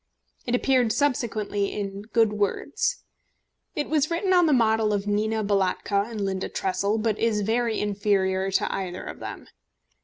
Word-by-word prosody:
It 245 - +2
appeared 250 -3 +2
subsequently 215 -7 0
in 195 -1 -4
Good 225 -2 +3
Words. 210 - -1 0.7
It 295 - -1
was 305 -1 +1
written 360 +3 +1
on 355 -2 +5
the - - +3
model 220 -4 +3
of 200 -1 -1
Nina 215 +1 0
Balatka 200 +1 0
and 225 -2 -6
Linda 190 -1 -2
Tressel, 200 +3 -1
but 215 -1 0
is 220 -2 +1
very 225 +2 0
inferior 195 -2 +1
to 195 - 0
either 185 -2 -4
of - - -8
them. - - -7
215 Hz, 155 wpm, -25 LUFS, 200-235 Hz, 0.7 s, on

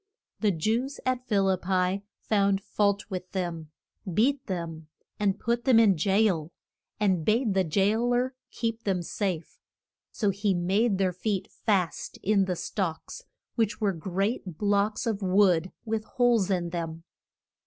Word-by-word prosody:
The 215 - +2
Jews 225 - -1
at 255 -1 -1
Phil 200 -3 +2
ip 185 -1 +1
pi 185 +1 +1 0.2
found 200 -2 +2
fault 200 -1 +1
with 185 -1 -5
them, 170 -4 -3 0.4
beat 260 +9 +2
them 165 -4 -5 0.3
and 200 -1 +1
put 235 +1 0
them 255 -4 +6
in 210 -4 +5
jail, 190 -2 +2 0.5
and 190 -6 +2
bade 220 +3 +2
the 190 0 +3
jail 205 +8 +1
er 255 +2 0 0.2
keep 230 -1 -3
them 190 -4 0
safe. 180 -3 -3 0.5
So 205 -3 +1
he 200 0 0
made 195 +5 +2
their 185 -2 +1
feet 195 +1 -2
fast 190 -6 -1
in 200 -1 +3
the 185 -1 -1
stocks 190 - -4 0.3
which 225 -3 0
were 205 -3 +1
great 190 +1 -2
blocks 205 +1 +1
of 220 -3 -1
wood 185 -2 +3
with 220 -1 -1
holes 235 -5 +2
in 175 -3 0
them. 165 -1 -4
195 Hz, 150 wpm, -27 LUFS, 180-220 Hz, 0.5 s, them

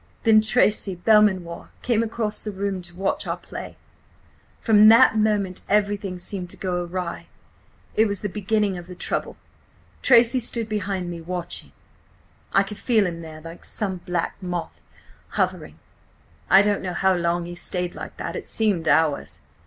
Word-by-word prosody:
Then 220 -2 +6
Tracy 215 -3 +2
Belmanoir 185 -3 +2
came 235 -2 +2
across 220 -2 -2
the 215 - -5
room 195 -1 -3
to 175 0 -12
watch 190 +2 -1
our - - -2
play. - - -9 0.8
From 215 -2 +6
that 230 +1 +7
moment 210 -4 +1
everything 205 -2 0
seemed 180 0 -6
to - - -5
go 180 -2 -2
awry. 175 0 -5 0.7
It 220 +1 +3
was 200 -2 -2
the 205 - -1
beginning 205 -1 -1
of 175 - -11
the 180 - -9
trouble. - - -3 0.6
"Tracy 240 0 +5
stood 235 -1 -1
behind 195 -4 -3
me 170 -1 -7
watching.... 175 +1 -5 0.8
I 195 - +4
could 200 +1 -8
feel 220 -5 +2
him 170 -2 -4
there, 155 -1 -10
like 165 +2 -10
some 195 -4 -4
black 175 -1 -3
moth, 175 -2 -5 0.6
hovering.... - - -1 0.7
I 195 +1 +7
don't 205 -1 +1
know 180 -2 -4
how 190 +2 +3
long 170 -1 0
he 175 - -7
stayed 180 0 -3
like - - -9
that–it - - -5
seemed 200 -7 0
hours. 145 - +1
190 Hz, 160 wpm, -23 LUFS, 175-215 Hz, 0.8 s, that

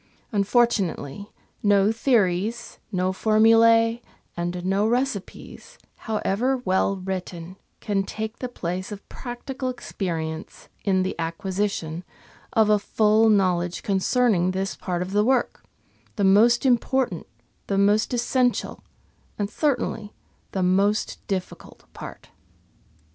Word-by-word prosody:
Unfortunately, 200 - 0 0.3
no 205 0 +4
theories, 225 -2 0
no 185 -1 0
formulae, 225 +2 +4 0.3
and 175 +1 -3
no 195 +3 +2
recipes, 250 - -3 0.2
however 225 +4 -1
well 195 -4 0
written, 185 -2 -6 0.3
can 205 -2 0
take 220 +3 -5
the 250 - -4
place 185 -3 -4
of 205 -1 -9
practical 255 +1 -5
experience 165 -9 -5
in 190 -2 +2
the 185 - -2
acquisition 170 0 -3 0.5
of 220 -2 +4
a 210 -1 +4
full 215 +2 +3
know 190 -4 +3
ledge 175 0 -4
concerning 195 -1 +2
this 190 +1 -2
part 180 -1 -3
of 185 - -7
the 205 +1 +3
work 255 +1 0 0.3
— - - -36
the 205 - -1
most 225 +6 +5
important, 250 -6 +1 0.4
the 195 - 0
most 205 +2 +3
essential, 245 +1 0 0.5
and 205 0 -2
certainly 240 -7 -1 0.4
the 190 - -1
most 195 +4 +1
difficult 190 -2 -5
part. - - -10
205 Hz, 115 wpm, -24 LUFS, 185-230 Hz, 0.5 s, most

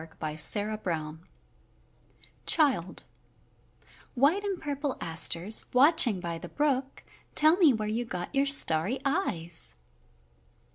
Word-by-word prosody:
WILD 160 0 -15
ASTERS 160 0 -2 1.3
CHILD 265 - +1 1.1
White 295 +11 +1
and 395 -3 -4
purple 285 -2 -5
asters, 170 +5 +2
watching 250 - +5
by 170 -2 -6
the - - -10
brook, 275 -2 -3 0.3
Tell 310 +2 +4
me 335 -7 +4
where 215 -3 -4
you 225 +3 -3
got 180 -4 -7
your 275 0 0
starry 220 - +4
eyes. 175 - -3
225 Hz, 105 wpm, -27 LUFS, 170-285 Hz, 1.3 s, watching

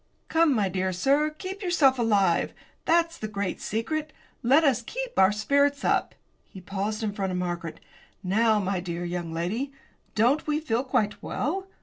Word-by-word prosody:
"Come, 325 -4 +4
my 205 -4 +2
dear 185 0 -1
sir, 275 +12 +2
keep 375 +6 -7
yourself 305 -9 +3
alive. 200 -7 +2 0.3
That's 335 0 +2
the 215 - -3
great 200 -3 -3
secret; 300 +8 -2 0.3
let 275 +7 +5
us 265 -5 +3
keep - - -5
our 190 +1 +6
spirits 280 +7 +1
up!" - - +1 0.3
he 190 - -10
paused 205 +4 -3
in 210 -2 -1
front 195 -2 -2
of 180 - -2
Margaret. 175 -2 -4 0.4
"Now, 215 +4 +3
my 195 -2 -1
dear 175 -1 -4
young 175 -1 -4
lady, 200 +12 -2 0.4
don't 245 +9 +2
we 300 0 +1
feel 255 -6 -1
quite 215 -5 0
well? 380 +8 -2
225 Hz, 165 wpm, -26 LUFS, 190-295 Hz, 0.4 s, our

